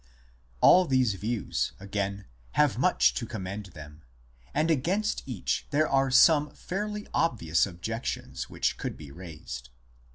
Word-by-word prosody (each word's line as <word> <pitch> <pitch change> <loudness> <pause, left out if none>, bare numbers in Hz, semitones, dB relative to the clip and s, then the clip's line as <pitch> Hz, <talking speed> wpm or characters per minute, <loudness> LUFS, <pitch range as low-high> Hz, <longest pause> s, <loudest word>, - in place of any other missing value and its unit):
All 185 +1 +7
these 130 - +2
views, 110 +4 -2
again, 100 0 -3 0.3
have 145 -8 +3
much 180 +7 +4
to 115 - -4
commend 100 -2 -5
them; 75 -3 -12 0.5
and 155 +3 +1
against 185 +9 0
each 120 -8 -2
there 155 +2 +2
are 135 0 +2
some 150 +3 +6
fairly 210 +2 -4
obvious 100 - +2
objections 110 +6 -5
which - - -1
could - - -4
be 75 -3 -11
raised. 75 -8 -9
115 Hz, 130 wpm, -28 LUFS, 95-150 Hz, 0.5 s, All